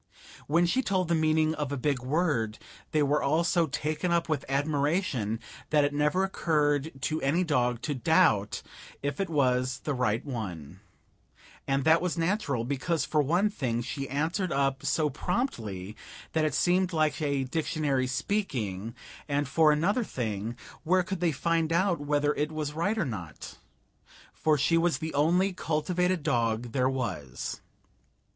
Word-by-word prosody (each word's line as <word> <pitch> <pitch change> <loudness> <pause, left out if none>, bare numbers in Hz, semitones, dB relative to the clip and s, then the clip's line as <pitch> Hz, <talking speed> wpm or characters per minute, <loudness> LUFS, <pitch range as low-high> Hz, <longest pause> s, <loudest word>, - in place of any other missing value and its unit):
When 165 +4 +3
she 255 +10 +2
told 185 -7 0
the - - +3
meaning 155 -1 +2
of 150 -3 -3
a 140 - -2
big 140 0 0
word 130 -6 0 0.3
they 155 -1 +3
were 145 +1 +2
all 155 +4 +2
so 170 -1 +2
taken 155 +4 -2
up 170 -1 +2
with 155 -4 -1
admiration 140 - 0 0.3
that 150 -1 +4
it 145 0 0
never 150 +6 +2
occurred 150 -5 +1
to 155 0 -1
any 160 +7 +2
dog 125 -7 0
to 150 - -1
doubt 135 - +2 0.4
if 145 +6 -2
it 195 -3 -1
was 130 -3 +1
the 150 - -2
right 125 -1 0
one; 95 - -6 0.9
and 135 0 +1
that 160 +2 +5
was 180 -1 -1
natural, 165 - 0
because, 145 +5 -1
for 150 - +2
one 175 +9 +2
thing, 120 - -2
she 135 +2 -5
answered 165 +7 -1
up 135 -1 0
so 155 -2 +1
promptly 110 - -3 0.4
that 160 -1 +2
it 150 - 0
seemed 180 0 +2
like 155 0 +1
a 140 -2 0
dictionary 145 -2 -1
speaking, 125 - -2 0.3
and 145 0 0
for 155 +3 +4
another 185 +11 +2
thing, 110 - -3 0.3
where 185 +3 +3
could 190 +1 -4
they 170 -1 +2
find 165 +2 0
out 175 0 +2
whether 145 0 +1
it 150 +2 -1
was 155 -1 -3
right 200 +8 0
or 190 - +1
not? 90 - -7 0.7
for 155 -1 +2
she 165 +4 +3
was 170 0 +2
the 160 -1 -5
only 175 +7 +2
cultivated 180 +1 0
dog 115 -4 0
there 130 0 +2
was. 95 - -4
150 Hz, 160 wpm, -28 LUFS, 130-170 Hz, 0.9 s, that